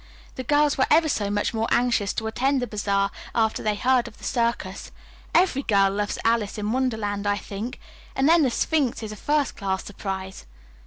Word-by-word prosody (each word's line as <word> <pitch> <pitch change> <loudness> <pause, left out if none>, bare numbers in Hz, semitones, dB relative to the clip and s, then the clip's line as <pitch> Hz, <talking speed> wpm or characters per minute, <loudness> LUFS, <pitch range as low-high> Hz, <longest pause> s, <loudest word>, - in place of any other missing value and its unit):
"The 260 - -5
girls 290 +2 +2
were 260 - +4
ever 315 +1 +5
so 210 -9 -1
much 205 +2 0
more 225 0 0
anxious 235 -5 +2
to 220 - -3
attend 265 +5 +1
the 250 - -1
bazaar 200 -2 0 0.2
after 220 -1 +1
they 215 -1 0
heard 250 +3 +2
of 225 - -12
the - - -18
circus. 230 -5 -2 0.4
Every 345 -6 +3
girl 200 -6 +3
loves 205 0 -2
'Alice 225 -3 +1
in 210 0 -2
Wonderland,' 220 -5 -1
I 205 0 +2
think. 210 +5 -6 0.4
And 270 +1 +2
then 335 +1 +6
the 270 - +3
Sphinx 265 -2 0
is 215 - -5
a - - -6
first 290 +5 0
class 190 -2 -2
surprise." 190 - -6
220 Hz, 195 wpm, -24 LUFS, 205-260 Hz, 0.4 s, then